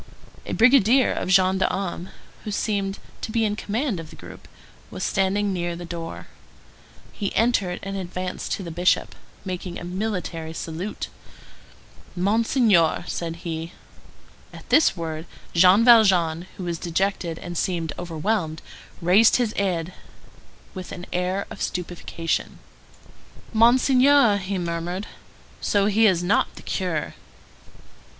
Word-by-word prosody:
A -, -, -3 dB
brigadier 255 Hz, +1 st, +5 dB
of -, -, -3 dB
gendarmes, 190 Hz, -1 st, +1 dB, 0.3 s
who -, -, -5 dB
seemed 200 Hz, -1 st, -1 dB, 0.2 s
to -, -, -4 dB
be 225 Hz, 0 st, +1 dB
in 210 Hz, -1 st, 0 dB
command 220 Hz, -, -2 dB
of 160 Hz, -2 st, -8 dB
the -, -, -12 dB
group, -, -, -12 dB, 0.4 s
was -, -, -6 dB
standing 195 Hz, +1 st, +1 dB
near 175 Hz, -1 st, -2 dB
the 175 Hz, +1 st, -7 dB
door. 170 Hz, -1 st, -6 dB, 0.9 s
He 200 Hz, -3 st, -4 dB
entered 205 Hz, -6 st, +1 dB
and 195 Hz, 0 st, -4 dB
advanced 185 Hz, -1 st, -5 dB
to 195 Hz, -, -4 dB
the 170 Hz, -, -6 dB
Bishop, 175 Hz, +3 st, +1 dB, 0.3 s
making 180 Hz, -1 st, -5 dB
a -, -, -8 dB
military 180 Hz, -4 st, -4 dB
salute. 165 Hz, +5 st, -5 dB, 1.1 s
"Monseigneur—" 205 Hz, -, +2 dB
said 165 Hz, -1 st, -3 dB
he. 165 Hz, 0 st, -4 dB, 0.8 s
At -, -, -13 dB
this 315 Hz, -, +4 dB
word, 160 Hz, 0 st, -5 dB, 0.3 s
Jean 185 Hz, +6 st, +6 dB
Valjean, 185 Hz, -8 st, +5 dB
who 185 Hz, -, -6 dB
was 170 Hz, -2 st, -3 dB
dejected 175 Hz, -1 st, -1 dB
and 175 Hz, 0 st, -7 dB
seemed 165 Hz, -3 st, -1 dB
overwhelmed, 170 Hz, -1 st, -2 dB, 0.4 s
raised 195 Hz, +6 st, +6 dB
his 240 Hz, -4 st, +1 dB
head 180 Hz, -3 st, -1 dB, 0.8 s
with 185 Hz, -2 st, -8 dB
an 180 Hz, -, -7 dB
air 180 Hz, +2 st, -1 dB
of -, -, -8 dB
stupefaction. 175 Hz, -2 st, -3 dB, 1.0 s
"Monseigneur!" 250 Hz, +1 st, +5 dB
he 195 Hz, 0 st, -3 dB
murmured. 175 Hz, +2 st, -3 dB, 0.6 s
"So 200 Hz, -1 st, +2 dB
he 215 Hz, +2 st, +4 dB
is 180 Hz, -3 st, +2 dB
not 180 Hz, -, +1 dB
the -, -, -12 dB
curé?" 175 Hz, -5 st, -2 dB
185 Hz, 130 wpm, -24 LUFS, 170-210 Hz, 1.1 s, Jean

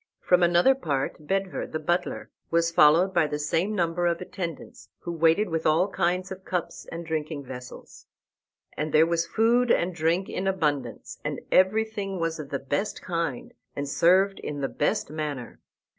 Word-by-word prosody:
From 180 Hz, 0 st, +3 dB
another 175 Hz, +9 st, +5 dB
part 150 Hz, -, -3 dB
Bedver, 195 Hz, -1 st, -1 dB
the -, -, -1 dB
butler, 175 Hz, +3 st, -2 dB, 0.2 s
was 165 Hz, 0 st, +2 dB
followed 170 Hz, +3 st, +5 dB
by 170 Hz, -4 st, +3 dB
the 150 Hz, 0 st, -3 dB
same 165 Hz, +8 st, 0 dB
number 175 Hz, -1 st, +1 dB
of 170 Hz, -1 st, 0 dB
attendants, 170 Hz, -4 st, -7 dB
who 170 Hz, -, -5 dB
waited 165 Hz, +5 st, +3 dB
with 165 Hz, -1 st, -1 dB
all 165 Hz, +6 st, +3 dB
kinds 185 Hz, 0 st, -1 dB
of 190 Hz, 0 st, -7 dB
cups 180 Hz, -3 st, -4 dB
and 170 Hz, +1 st, -6 dB
drinking 155 Hz, -2 st, -3 dB
vessels. 125 Hz, -1 st, -10 dB, 0.7 s
And 155 Hz, 0 st, -2 dB
there 155 Hz, +1 st, +7 dB
was 170 Hz, 0 st, 0 dB
food 235 Hz, +6 st, +2 dB
and 180 Hz, -3 st, +2 dB
drink 170 Hz, +3 st, 0 dB
in 190 Hz, -, -3 dB
abundance, 145 Hz, -, -2 dB
and -, -, -3 dB
everything 200 Hz, 0 st, +2 dB
was 165 Hz, -1 st, -2 dB
of 145 Hz, -2 st, -7 dB
the 140 Hz, -, -1 dB
best 145 Hz, +9 st, -3 dB
kind, 165 Hz, -7 st, -3 dB, 0.2 s
and 145 Hz, 0 st, -3 dB
served 185 Hz, +6 st, +3 dB
in 145 Hz, -1 st, -5 dB
the 135 Hz, -, 0 dB
best 145 Hz, -, -1 dB
manner. 150 Hz, -6 st, -5 dB
170 Hz, 170 wpm, -26 LUFS, 155-185 Hz, 0.7 s, there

